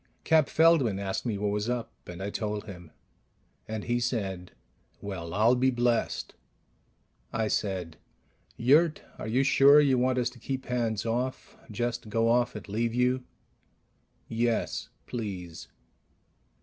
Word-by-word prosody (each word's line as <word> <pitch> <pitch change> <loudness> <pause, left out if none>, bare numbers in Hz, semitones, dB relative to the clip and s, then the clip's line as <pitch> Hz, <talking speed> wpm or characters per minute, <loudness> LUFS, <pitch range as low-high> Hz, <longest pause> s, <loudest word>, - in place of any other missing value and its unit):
Cap 160 -3 +4
Feldman 160 -11 +4
asked 100 +4 -3
me 110 -3 -1
what 105 0 -1
was 105 +2 -1
up, 120 -2 -2 0.2
and 90 +2 -7
I 100 - -3
told 105 -1 -3
him, 90 -5 -10 0.8
and 110 -1 -4
he 120 +1 0
said, 95 -7 -3 0.5
"Well, 90 -5 -6
I'll 110 +6 +4
be 130 +1 +3
blessed!" 120 -2 0 1.0
I 110 -1 0
said, 95 -6 -2 0.6
"Yurt, 150 +7 +3 0.2
are - - -5
you 125 +5 +2
sure 140 +2 +7
you 135 -4 +3
want 130 +1 +1
us 125 0 0
to 125 - -16
keep 135 +2 -4
hands 115 -4 -1
off... 125 +3 -3
just 115 +1 -3
go 115 +2 +2
off 120 -1 +2
and 105 - -8
leave 115 +3 -1
you?" 125 +1 +1 1.0
"Yes, 115 0 -1 0.2
please." 95 -8 -6
115 Hz, 140 wpm, -28 LUFS, 105-125 Hz, 1.0 s, sure